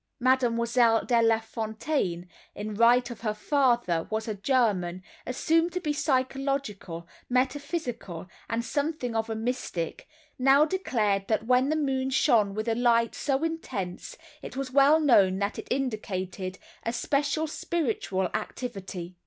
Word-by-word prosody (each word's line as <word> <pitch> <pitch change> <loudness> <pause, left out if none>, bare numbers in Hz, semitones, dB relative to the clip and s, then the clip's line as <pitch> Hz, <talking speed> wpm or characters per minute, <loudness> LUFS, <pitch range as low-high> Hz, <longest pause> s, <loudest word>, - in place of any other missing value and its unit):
Mademoiselle 235 -2 +3
De 235 -2 +3
Lafontaine—in 220 - -2
right 240 +3 +4
of 235 - -9
her 215 -2 -1
father 240 - +2
who 220 - -1
was 220 +1 -3
a 215 - -1
German, 200 -6 0 0.2
assumed 325 +7 +1
to 360 - -2
be 300 -4 -1
psychological, 260 - -2 0.2
metaphysical, 255 - -2 0.2
and 230 +1 -1
something 285 -5 -2
of 225 0 -1
a 225 - -2
mystic—now 260 - 0
declared 220 - 0
that 220 0 0
when 255 +3 +3
the 310 - +1
moon 265 -3 0
shone 220 -6 +3
with 215 +2 -3
a 230 - +2
light 235 -1 +2
so 275 +1 -1
intense 205 - -4 0.2
it - - -8
was 270 -1 -3
well 280 +3 +6
known 200 -11 +4
that 200 +1 -2
it - - -8
indicated 190 -7 -3 0.2
a 230 - -2
special 285 +5 0
spiritual 250 - -1
activity. 190 -7 -5
240 Hz, 135 wpm, -27 LUFS, 210-275 Hz, 0.2 s, well